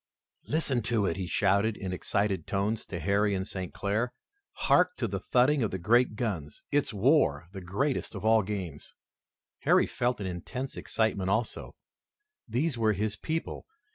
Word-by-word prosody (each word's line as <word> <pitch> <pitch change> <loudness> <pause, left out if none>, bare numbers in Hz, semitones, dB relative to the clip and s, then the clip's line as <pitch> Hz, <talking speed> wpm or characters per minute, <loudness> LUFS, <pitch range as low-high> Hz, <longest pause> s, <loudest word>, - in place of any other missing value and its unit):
"Listen 140 -5 +1
to 110 -2 0
it!" 85 - 0
he 95 -2 -4
shouted 100 +3 +2
in 95 -1 -4
excited 95 -1 -1
tones 100 +3 -1
to 85 - -5
Harry 100 +4 +2
and 95 0 -2
St. 95 -2 -5
Clair. 110 +5 -1 0.4
"Hark - - +3
to - - -1
the - - -3
thudding 130 +3 +3
of 110 - +1
the 95 - -3
great 115 +5 +3
guns! 95 -11 -4
It's 145 -2 +2
war, 100 - +3
the 95 -1 -7
greatest 110 +9 -1
of 100 +1 -5
all 110 0 +5
games!" 95 -7 -6 0.6
Harry - - +4
felt 125 -1 -1
an 100 - -4
intense 125 +9 -5
excitement 100 -4 -1
also. 110 +4 -1 0.7
These 125 +3 -1
were 110 -1 +3
his 105 +2 -1
people. 160 +8 -4
105 Hz, 165 wpm, -29 LUFS, 95-120 Hz, 0.7 s, all